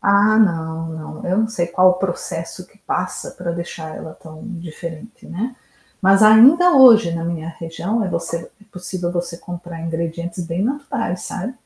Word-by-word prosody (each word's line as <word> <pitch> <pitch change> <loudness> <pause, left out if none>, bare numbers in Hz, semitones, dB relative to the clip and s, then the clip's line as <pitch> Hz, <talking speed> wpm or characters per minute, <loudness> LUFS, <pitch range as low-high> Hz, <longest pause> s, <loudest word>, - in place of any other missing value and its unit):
Ah, 205 +2 +4
não, 165 -5 +1 0.3
não, - - -7
eu 185 - +1
não 220 0 +2
sei 175 -6 -2
qual 185 +2 +4
o 180 - +1
processo 180 -1 -5
que 205 - -26
passa 185 -2 -4
para 175 -1 -5
deixar 170 -2 -6
ela 160 - -9
tão 160 -2 -13 0.2
diferente, 170 +6 -9
né, 235 +8 -5 0.4
mas 195 +1 +5
ainda 265 +12 +7
hoje, 230 -9 +7
na 165 0 -3
minha 165 -1 -4
região, 175 +7 -2
eh, 190 - -2
você 170 -1 -3 0.2
é - - -19
possível 180 -1 -5
você 175 -1 -4
comprar 175 -1 -8
ingredientes 170 +1 -4
bem 170 +3 -2
naturais, 255 -7 -3
sabe, 220 +8 -5
180 Hz, 170 wpm, -20 LUFS, 170-210 Hz, 0.4 s, ainda